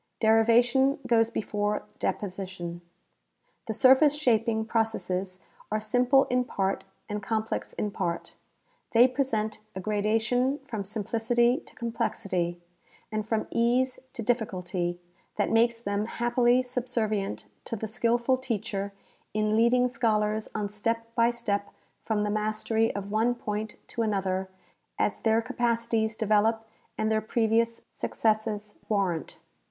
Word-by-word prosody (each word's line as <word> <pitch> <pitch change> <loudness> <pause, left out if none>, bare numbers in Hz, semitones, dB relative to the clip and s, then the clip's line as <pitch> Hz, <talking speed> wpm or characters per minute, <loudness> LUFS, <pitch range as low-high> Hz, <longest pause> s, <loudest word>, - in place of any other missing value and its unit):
Derivation 240 +5 +4
goes 225 -1 +3
before 210 -2 -1 0.2
deposition. 185 -3 -4 0.9
•The 220 - -2
surface 265 +4 +6
shaping 230 -5 +2
processes 195 -5 -1 0.3
are 215 - +1
simple 250 +5 +4
in 250 0 +1
part 195 -5 -1 0.2
and 210 0 -3
complex 220 +1 -2
in 210 - -2
part. 170 -3 -3 0.6
They 240 +2 +7
present 240 -5 -1 0.2
a - - -3
gradation 225 +6 +1
from 225 -7 -5
simplicity 235 +4 +1
to - - -17
complexity, 185 -7 -2 0.5
and 215 0 -1
from 220 -1 0
ease 245 +2 +2
to 235 - -5
difficulty, 180 -6 -1 0.4
that - - 0
makes 230 +1 +3
them 205 -1 -2
happily 240 +1 +2
subservient 225 -5 -2 0.2
to - - -3
the 220 - -4
skillful 235 +3 +1
teacher 205 -5 -3 0.4
in 215 0 +2
leading 240 +2 +4
scholars 215 -3 0
on 210 -1 -1
step 230 +2 -2
by 235 -1 +4
step 210 -4 -2 0.3
from 215 -2 0
the 210 - 0
mastery 215 +1 +1
of 200 0 -5
one 225 +3 +2
point 215 -2 -4
to 235 - -2
another 190 -3 0 0.5
as - - 0
their 225 0 +2
capacities 230 -2 0
develop 220 +1 +2 0.3
and 220 0 0
their 220 0 +2
previous 230 +1 +1
successes 215 -1 -1 0.2
warrant. 190 -6 -1
220 Hz, 125 wpm, -28 LUFS, 210-235 Hz, 0.9 s, They